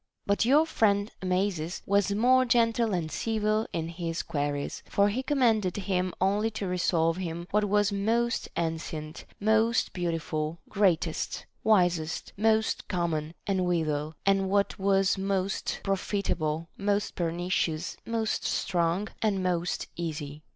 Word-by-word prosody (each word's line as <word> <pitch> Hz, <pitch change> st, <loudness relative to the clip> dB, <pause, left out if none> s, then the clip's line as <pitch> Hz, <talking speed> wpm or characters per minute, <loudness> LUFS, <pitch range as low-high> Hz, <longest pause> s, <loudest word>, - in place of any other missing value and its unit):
But 200 Hz, +2 st, +2 dB
your 290 Hz, +6 st, +5 dB
friend 205 Hz, -8 st, +1 dB
Amasis 185 Hz, -2 st, -1 dB
was 200 Hz, 0 st, +2 dB
more 250 Hz, +5 st, +4 dB
gentle 230 Hz, -2 st, +2 dB
and 170 Hz, -4 st, -2 dB
civil 215 Hz, -1 st, 0 dB
in 160 Hz, -1 st, -2 dB
his 165 Hz, -1 st, -3 dB
queries; 145 Hz, -3 st, -2 dB
for 200 Hz, 0 st, +3 dB
he 235 Hz, +6 st, -1 dB
commanded 230 Hz, -, +2 dB
him 185 Hz, -2 st, 0 dB
only 205 Hz, +4 st, +2 dB
lo 200 Hz, -, -2 dB
resolve 170 Hz, -2 st, +1 dB
him 170 Hz, -2 st, -4 dB
what 210 Hz, +1 st, +3 dB
was 205 Hz, 0 st, +2 dB
most 230 Hz, +4 st, 0 dB
ancient, 160 Hz, -1 st, -4 dB
most 220 Hz, +2 st, +2 dB
beau 175 Hz, -2 st, -1 dB
tiful, 155 Hz, -1 st, -2 dB
greatest, 180 Hz, -5 st, 0 dB, 0.2 s
wisest, 175 Hz, -7 st, +2 dB
most 220 Hz, +1 st, +1 dB
common, 165 Hz, -3 st, -2 dB
and 190 Hz, -2 st, +1 dB
withal, 155 Hz, -3 st, -1 dB
what 195 Hz, +1 st, +2 dB
was 195 Hz, 0 st, +2 dB
most 195 Hz, 0 st, -1 dB
profitable, 180 Hz, -5 st, -1 dB
most 205 Hz, +1 st, 0 dB
pernicious, 170 Hz, -1 st, -1 dB
most 225 Hz, -1 st, -1 dB
strong, 175 Hz, +3 st, 0 dB
and 200 Hz, -4 st, +1 dB
most 175 Hz, -1 st, -1 dB
easy. 150 Hz, -3 st, -5 dB
190 Hz, 130 wpm, -28 LUFS, 165-210 Hz, 0.2 s, your